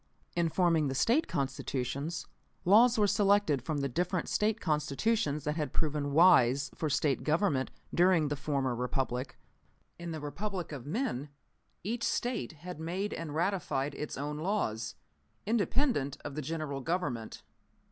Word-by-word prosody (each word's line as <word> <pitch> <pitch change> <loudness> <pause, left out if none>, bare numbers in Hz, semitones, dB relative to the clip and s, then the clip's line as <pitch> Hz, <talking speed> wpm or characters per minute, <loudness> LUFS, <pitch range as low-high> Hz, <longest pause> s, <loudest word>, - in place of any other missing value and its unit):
"In 170 -1 +2
forming 165 -3 +3
the 135 - -2
State 250 - +3
Constitutions, 140 +3 -2 0.4
laws 230 +6 +6
were 210 - +4
selected 200 -8 +3
from 150 +1 -2
the 140 - 0
different 180 +6 -1
State 215 +1 +1
Constitutions 150 +1 0
that 150 +2 -1
had 150 -2 -2
proven 150 -2 -1
wise 140 -4 +5
for 155 - -2
State 145 -1 +1
Government 155 -4 +1 0.2
during 175 -3 +4
the 145 - -1
former 140 -3 -1
Republic. 125 +1 -2 0.6
In 170 0 -5
the 160 -1 -4
Republic 175 +5 -4
of 140 -3 -7
men, 155 - -2 0.5
each 230 +5 -2
State 240 - -1
had 175 +2 -8
made 180 +6 -2
and 155 -3 -5
ratified 165 -6 0
its 150 - -5
own 145 +2 -3
laws, 115 - -1 0.5
independent 225 - +1
of - - -4
the 155 - -3
General 150 -2 -3
Government. 145 -8 -3
155 Hz, 145 wpm, -31 LUFS, 140-185 Hz, 0.6 s, laws